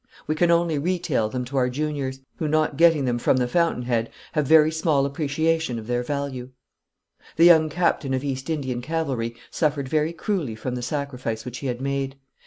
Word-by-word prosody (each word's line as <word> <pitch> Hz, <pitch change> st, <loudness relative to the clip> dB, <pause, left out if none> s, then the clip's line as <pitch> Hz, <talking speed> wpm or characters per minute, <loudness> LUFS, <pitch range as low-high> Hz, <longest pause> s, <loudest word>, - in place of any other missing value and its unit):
We 155 Hz, -, 0 dB
can 170 Hz, +2 st, +2 dB
only 170 Hz, -3 st, +2 dB
retail 160 Hz, -9 st, 0 dB
them 125 Hz, +1 st, -3 dB
to 135 Hz, +3 st, -4 dB
our 125 Hz, -1 st, +2 dB
juniors, 135 Hz, -1 st, -3 dB, 0.2 s
who, 155 Hz, -, -2 dB
not 155 Hz, -1 st, +1 dB
getting 165 Hz, -3 st, +4 dB
them 120 Hz, -1 st, 0 dB
from 130 Hz, -, +2 dB
the 125 Hz, -1 st, +1 dB
fountain 165 Hz, -2 st, +1 dB
head, 115 Hz, -2 st, 0 dB, 0.2 s
have 150 Hz, -3 st, 0 dB
very 155 Hz, 0 st, +6 dB
small 160 Hz, -3 st, +1 dB
appreciation 155 Hz, 0 st, 0 dB
of 110 Hz, -, -7 dB
their 120 Hz, +1 st, 0 dB
value. 130 Hz, -1 st, -4 dB, 0.9 s
The 165 Hz, -, +5 dB
young 160 Hz, -2 st, +7 dB
captain 155 Hz, -5 st, 0 dB
of 130 Hz, -, -3 dB
East 135 Hz, 0 st, -4 dB
Indian 130 Hz, -6 st, -2 dB
cavalry 130 Hz, -6 st, -2 dB, 0.2 s
suffered 145 Hz, -4 st, 0 dB
very 155 Hz, +3 st, +1 dB
cruelly 170 Hz, -, -2 dB
from 125 Hz, +3 st, -4 dB
the 125 Hz, -, -3 dB
sacrifice 125 Hz, -4 st, -3 dB
which 125 Hz, 0 st, -6 dB
he 140 Hz, -, -4 dB
had 125 Hz, 0 st, -3 dB
made. 135 Hz, 0 st, -2 dB
140 Hz, 195 wpm, -24 LUFS, 125-160 Hz, 0.9 s, young